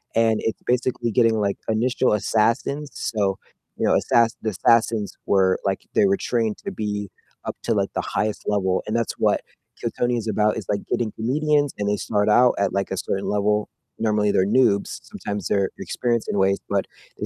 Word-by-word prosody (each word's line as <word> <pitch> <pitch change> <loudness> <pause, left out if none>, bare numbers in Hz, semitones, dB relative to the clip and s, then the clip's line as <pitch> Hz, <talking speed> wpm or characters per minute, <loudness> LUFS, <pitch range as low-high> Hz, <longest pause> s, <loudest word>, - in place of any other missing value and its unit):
and 115 -1 +3
it's 110 - -2
basically 125 -1 0
getting, 115 0 +3
like, 100 -1 0
initial 120 +3 +2
assassins, 115 +7 0
so, 100 -3 -1 0.4
you - - 0
know, - - +3
assass 115 -1 +2
the 110 - -1
assassins 110 +1 +2
were, 95 -1 +3
like 95 -1 -1
they 215 - +5
were 195 0 +3
trained 115 - -1
to 200 - -6
be 105 - -3 0.4
up - - -4
to, - - +1
like, - - 0
the - - -1
highest 105 0 -2
level, 95 -3 +1
and 110 - -2
that's 115 -1 0
what - - +1 0.4
Kill - - -2
Tony 120 0 +1
is 115 -1 -4
about, 105 0 +1
is, 105 - -6
like, 100 -1 0
getting 115 -3 -1
comedians 145 +4 +1
and 105 - -2
they 105 - +1
start 105 -1 0
out 120 +3 +5
at, 100 -1 +1
like, 100 0 -1
a 95 - -2
certain 95 +2 -2
level. 105 +1 +1 0.3
Normally 105 -2 +2
they're 95 - +3
noobs, 110 -3 +2
sometimes 100 -2 -5
they're 100 -2 +1
experienced 120 -2 -1
in - - -1
ways, 95 +1 +3
but 100 -1 +1 0.3
they - - -2
110 Hz, 195 wpm, -23 LUFS, 100-120 Hz, 0.4 s, they